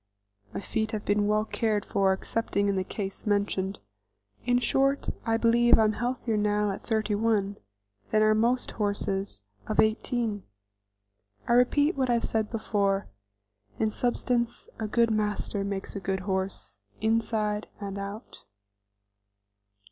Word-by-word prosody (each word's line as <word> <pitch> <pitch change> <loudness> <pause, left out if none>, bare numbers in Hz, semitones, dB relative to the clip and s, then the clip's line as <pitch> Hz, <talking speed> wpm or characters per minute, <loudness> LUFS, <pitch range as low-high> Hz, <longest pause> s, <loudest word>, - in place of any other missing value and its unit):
My - - -4
feet 220 +2 -2
have 210 -1 -3
been 205 0 +2
well 215 0 +2
cared 215 -2 0
for 195 -1 +2
excepting 200 +1 -1
in 200 - +1
the 190 - 0
case 195 +2 -5
mentioned. 200 -1 0 0.7
In 245 0 +4
short 275 +3 +1 0.2
I 225 0 +3
believe 240 +1 +5
I 220 - +4
am 215 - +3
healthier 240 -1 -1
now 210 0 +1
at 195 - -6
thirty 220 -2 0
one 205 -2 +1 0.5
than 215 0 +3
are 215 0 +5
most 235 +3 +1
horses 200 - -2 0.2
of 215 - -2
eighteen. 220 -1 +1 1.1
I - - +3
repeat 285 +6 +4
what 260 -2 +1
I - - +4
have 235 - 0
said 220 -1 0
before, 200 -3 0 0.7
in 220 -1 +1
substance, 240 0 0
a 220 - -2
good 230 +1 +2
master 210 -1 -1
makes 200 0 -4
a - - -2
good 190 0 -2
horse, 190 - -3 0.2
inside 220 -1 0
and 200 -1 -5
out. 200 +3 -8
215 Hz, 145 wpm, -28 LUFS, 200-230 Hz, 1.1 s, believe